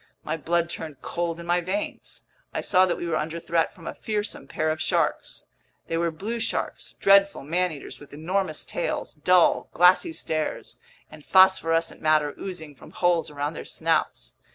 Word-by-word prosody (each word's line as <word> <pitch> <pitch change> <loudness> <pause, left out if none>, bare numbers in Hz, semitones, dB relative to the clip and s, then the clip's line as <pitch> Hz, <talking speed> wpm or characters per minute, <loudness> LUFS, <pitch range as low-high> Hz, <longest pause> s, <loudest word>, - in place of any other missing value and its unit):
My 155 - -2
blood 170 +2 0
turned 155 -5 -7
cold 170 -1 -3
in 170 - -8
my 175 +1 +2
veins! 190 +4 -4 0.3
I - - 0
saw 185 -1 +4
that 175 - -1
we - - -4
were 165 -2 0
under 160 +2 -3
threat 165 0 0
from 165 - -14
a - - -4
fearsome 210 -1 -4
pair 155 0 -1
of 155 0 -3
sharks. - - -1 0.4
They 165 - -3
were 170 0 +1
blue 205 +9 -4
sharks, - - -3
dreadful 195 -2 +4
man 175 +5 0
eaters 145 -3 -9
with 145 - -14
enormous 160 +2 -2
tails, 175 - -3
dull, 175 +3 +3
glassy 180 - +5
stares, 155 - -3 0.3
and 155 -1 -13
phosphorescent 165 -3 +4
matter 155 -2 +2
oozing 165 -6 -6
from 130 - -15
holes 175 -2 +1
around 145 +1 -3
their - - -7
snouts. - - -1
170 Hz, 175 wpm, -25 LUFS, 155-185 Hz, 0.4 s, glassy